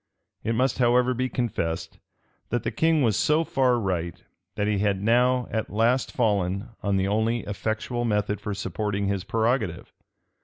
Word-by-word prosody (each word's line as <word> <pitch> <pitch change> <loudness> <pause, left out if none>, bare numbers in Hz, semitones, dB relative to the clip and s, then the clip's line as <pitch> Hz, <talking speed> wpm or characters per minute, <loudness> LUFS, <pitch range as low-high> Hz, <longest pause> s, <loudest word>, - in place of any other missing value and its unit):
It 115 - 0
must, 130 +3 +1
however, 125 +1 +3
be 130 +1 -1
confessed, 85 -11 -3 0.5
that 120 -1 -1
the - - -1
king 160 -2 +2
was 110 -4 +2
so 150 +8 +2
far 130 -5 +2
right, 90 -6 -2 0.4
that 105 -1 0
he 105 -1 +1
had 100 -1 +1
now 125 +4 +2
at 110 -1 -2
last 115 +5 +1
fallen 100 -3 0
on 100 -1 +1
the 95 0 +1
only 110 +3 +1
effectual 110 +5 -3
method 105 -2 0
for 105 -2 -3
supporting 100 0 -2
his 100 -2 -1
prerogative. 110 -5 -1
110 Hz, 160 wpm, -25 LUFS, 100-125 Hz, 0.5 s, however